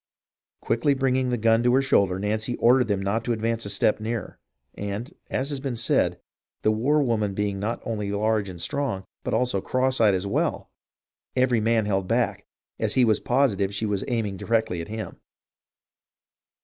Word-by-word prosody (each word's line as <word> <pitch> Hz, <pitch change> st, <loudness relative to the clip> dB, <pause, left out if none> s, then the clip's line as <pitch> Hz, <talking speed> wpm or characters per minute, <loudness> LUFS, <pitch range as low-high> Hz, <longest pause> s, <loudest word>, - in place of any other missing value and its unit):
Quickly 140 Hz, +5 st, +1 dB
bringing 130 Hz, -1 st, +1 dB
the 125 Hz, -, 0 dB
gun 115 Hz, +1 st, +3 dB
to 120 Hz, +1 st, +3 dB
her 135 Hz, -, +4 dB
shoulder, 100 Hz, -8 st, +2 dB
Nancy 110 Hz, +4 st, -1 dB
ordered 125 Hz, +1 st, +4 dB
them 100 Hz, -2 st, -1 dB
not 105 Hz, +3 st, 0 dB
to 120 Hz, -, +1 dB
advance 115 Hz, 0 st, -1 dB
a -, -, -3 dB
step 105 Hz, -, +2 dB
nearer, 110 Hz, +1 st, -4 dB, 0.3 s
and, 105 Hz, -, -5 dB, 0.2 s
as 135 Hz, +3 st, -2 dB
has 140 Hz, -, -3 dB
been 135 Hz, -3 st, -3 dB
said, 115 Hz, -, +1 dB, 0.4 s
the 110 Hz, -, +4 dB
war 140 Hz, +8 st, +2 dB
woman 105 Hz, -6 st, 0 dB
being 100 Hz, -1 st, -1 dB
not 110 Hz, +4 st, -3 dB
only 105 Hz, -3 st, -2 dB
large 105 Hz, 0 st, 0 dB
and 90 Hz, -2 st, -9 dB
strong, 95 Hz, -, -2 dB, 0.2 s
but -, -, -1 dB
also 125 Hz, -6 st, +1 dB
cross 130 Hz, +2 st, 0 dB
eyed 105 Hz, -3 st, +5 dB
as 95 Hz, +1 st, -2 dB
well, 100 Hz, -, -1 dB, 0.6 s
every 125 Hz, -3 st, +2 dB
man 115 Hz, 0 st, +2 dB
held 95 Hz, -2 st, 0 dB
back, 115 Hz, 0 st, 0 dB, 0.3 s
as -, -, -1 dB
he 130 Hz, -, +5 dB
was 110 Hz, -2 st, +3 dB
positive 105 Hz, -7 st, +1 dB
she 110 Hz, -, -1 dB
was 105 Hz, -2 st, -1 dB
aiming 110 Hz, -6 st, -1 dB
directly 110 Hz, -6 st, 0 dB
at 85 Hz, -, -7 dB
him. 110 Hz, 0 st, -6 dB
110 Hz, 180 wpm, -25 LUFS, 100-125 Hz, 0.6 s, eyed